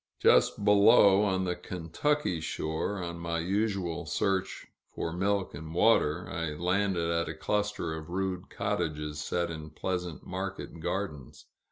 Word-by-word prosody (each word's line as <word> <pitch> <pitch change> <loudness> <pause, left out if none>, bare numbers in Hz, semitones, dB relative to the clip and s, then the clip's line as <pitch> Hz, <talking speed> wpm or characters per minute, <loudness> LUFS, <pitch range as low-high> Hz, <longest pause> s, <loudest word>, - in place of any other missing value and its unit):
Just 100 - +4
below, 105 -1 +7
on 95 -2 +1
the 90 -1 -1
Kentucky 90 - -1
shore, 80 +5 -2
on 85 0 -5
my 85 0 -2
usual 90 -2 -1
search 95 +5 -1 0.2
for 80 - -4
milk 95 +1 0
and 80 +1 -8
water, 90 -6 +3
I 80 -3 -3
landed 90 0 +1
at 85 0 0
a - - -5
cluster 105 -5 -1
of 80 +1 -7
rude 95 0 -2
cottages 75 -1 -2
set 85 +3 -1
in 80 -1 -7
pleasant 90 0 -4
market - - -5
gardens. 80 -7 -4
90 Hz, 140 wpm, -30 LUFS, 80-100 Hz, 0.2 s, below